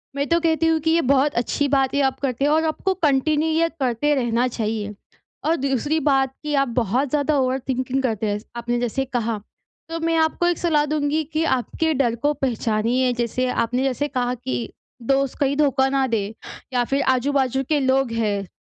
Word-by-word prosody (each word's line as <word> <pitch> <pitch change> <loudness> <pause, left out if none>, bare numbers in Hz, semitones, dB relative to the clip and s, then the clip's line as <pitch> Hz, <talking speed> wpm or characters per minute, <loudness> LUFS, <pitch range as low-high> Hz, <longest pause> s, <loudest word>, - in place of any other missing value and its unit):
मैं 280 +1 -1
तो 335 0 +3
कहती 325 -1 +1
हूँ 325 -1 +3
कि 320 - +3
ये 335 +1 +3
बहुत 280 +2 +3
अच्छी 285 +4 -1
बात 270 -1 +2
है, 285 - +2
आप 265 -1 0
करते 275 -1 -1
हैं 295 - +3
और 315 +1 +3
आपको 350 +4 0
कंटिन्यू 305 -2 +1
ये 330 +1 +2
करते 260 +3 +1
रहना 240 -1 +1
चाहिए। 215 -3 -3 0.5
और 325 - +3
दूसरी 275 +3 0
बात 270 -3 +2
कि, 300 0 -3
आप 275 0 +2
बहुत 245 +5 0
ज़्यादा 295 +1 +1
ओवरथिंकिंग 260 0 -1
करते 220 -4 -1
हैं, 205 0 -1 0.2
आपने 240 0 -2
जैसे 245 +3 -1
कहा। 235 -4 -2 0.5
तो 330 0 -3
मैं 330 0 0
आपको 320 +2 +1
एक 350 - +1
सलाह 305 -4 +2
दूँगी 300 +1 0
कि, 310 +2 -2
आपके 315 +3 0
डर 250 -5 +1
को 290 +6 0
पहचानिए 245 -1 0
जैसे, 240 +1 -1 0.2
आपने 250 +3 -1
जैसे 270 +2 0
कहा 250 -3 -1
कि, 125 - -4 0.3
दोस्त 270 +2 0
कहीं 280 0 +1
धोखा 275 -3 +3
ना 270 0 +1
दें 215 -3 -2 0.4
या 245 -1 +2
फ़िर 275 +3 0
आजू-बाजू 265 0 0
के 305 -2 +3
लोग 265 -2 +1
हैं, 205 -4 -1
270 Hz, 195 wpm, -22 LUFS, 245-295 Hz, 0.5 s, तो